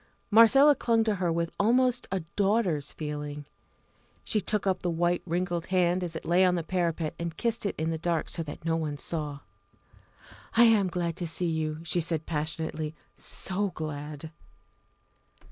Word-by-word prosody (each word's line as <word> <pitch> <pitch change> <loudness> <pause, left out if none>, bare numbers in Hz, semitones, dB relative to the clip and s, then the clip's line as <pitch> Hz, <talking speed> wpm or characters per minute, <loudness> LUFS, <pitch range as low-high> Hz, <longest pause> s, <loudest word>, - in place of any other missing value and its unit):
Marcella 270 +7 +7
clung 230 -3 +2
to 220 -1 +1
her 175 -2 0
with 170 0 -1
almost 245 +3 +2
a 190 -1 -1
daughter's 195 -8 +1
feeling. 150 -1 -5 0.8
She 215 - 0
took 210 +1 0
up 190 -1 +1
the 180 - -1
white 175 +1 +1
wrinkled 175 0 -1
hand 180 -1 +2
as 170 -2 -4
it 160 - -6
lay 175 +2 +4
on 180 -1 +4
the 170 - -2
parapet, 170 -3 -1
and 170 -1 -4
kissed 230 -2 -1
it - - -3
in 160 +1 -1
the 160 - -3
dark 170 -1 -1
so 170 - -3
that 155 0 -8
no 165 0 +1
one 155 -3 -2
saw. 150 -2 -4 1.2
"I 235 - +8
am 220 -4 +5
glad 170 -2 -2
to 175 - -3
see 165 +2 0
you 160 -2 -1
again," 155 +2 -9
she 170 +1 0
said 160 -1 -2
passionately, 155 0 -3 0.2
"so 200 +2 -2
glad!" 150 0 -6
170 Hz, 175 wpm, -28 LUFS, 160-190 Hz, 1.2 s, I